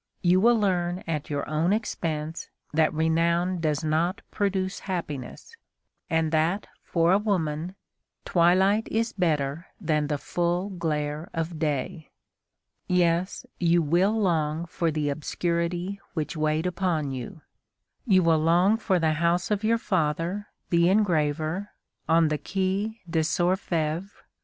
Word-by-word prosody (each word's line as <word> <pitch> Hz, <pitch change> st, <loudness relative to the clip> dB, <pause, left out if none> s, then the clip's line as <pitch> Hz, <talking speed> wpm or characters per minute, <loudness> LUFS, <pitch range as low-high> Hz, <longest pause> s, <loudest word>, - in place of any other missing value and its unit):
You 180 Hz, +1 st, +4 dB
will 235 Hz, +1 st, +5 dB
learn 180 Hz, -3 st, 0 dB
at 155 Hz, -3 st, -3 dB
your 145 Hz, -1 st, -2 dB
own 155 Hz, +4 st, +1 dB
expense 165 Hz, -7 st, -2 dB, 0.2 s
that 155 Hz, 0 st, +3 dB
renown 170 Hz, +3 st, +1 dB
does 155 Hz, -1 st, 0 dB
not 160 Hz, +4 st, 0 dB
produce 195 Hz, -2 st, -1 dB
happiness, 170 Hz, -, -5 dB, 0.5 s
and 160 Hz, -1 st, +1 dB
that, 165 Hz, +6 st, +1 dB, 0.2 s
for 170 Hz, 0 st, +1 dB
a 195 Hz, -, +5 dB
woman, 175 Hz, -4 st, -1 dB, 0.5 s
twilight 190 Hz, +5 st, +3 dB
is 225 Hz, +1 st, 0 dB
better 155 Hz, -3 st, -1 dB
than 155 Hz, -5 st, 0 dB
the 145 Hz, 0 st, -1 dB
full 175 Hz, +6 st, -1 dB
glare 155 Hz, -1 st, -2 dB
of 165 Hz, 0 st, -3 dB
day. 155 Hz, +2 st, -2 dB, 0.8 s
Yes, 175 Hz, +1 st, +1 dB
you 170 Hz, -1 st, +3 dB
will 185 Hz, +8 st, +2 dB
long 160 Hz, -4 st, 0 dB
for 165 Hz, 0 st, -1 dB
the 150 Hz, -1 st, -1 dB
obscurity 170 Hz, +5 st, -2 dB
which 155 Hz, 0 st, -2 dB
weighed 155 Hz, +1 st, 0 dB
upon 175 Hz, -5 st, -1 dB
you. 130 Hz, +4 st, -7 dB, 0.7 s
You 185 Hz, -4 st, +5 dB
will 165 Hz, -1 st, +4 dB
long 175 Hz, +7 st, +4 dB
for 195 Hz, -4 st, +1 dB
the 160 Hz, -2 st, +2 dB
house 170 Hz, +4 st, +1 dB
of 210 Hz, 0 st, 0 dB
your 230 Hz, +1 st, +3 dB
father, 180 Hz, 0 st, -1 dB, 0.2 s
the 170 Hz, 0 st, +4 dB
engraver, 170 Hz, -1 st, +1 dB, 0.4 s
on 165 Hz, -1 st, +4 dB
the 150 Hz, -1 st, -1 dB
Quai 195 Hz, +4 st, -2 dB
des 165 Hz, -1 st, 0 dB, 0.2 s
Orfèvres. 175 Hz, -1 st, 0 dB
170 Hz, 135 wpm, -26 LUFS, 155-185 Hz, 0.8 s, will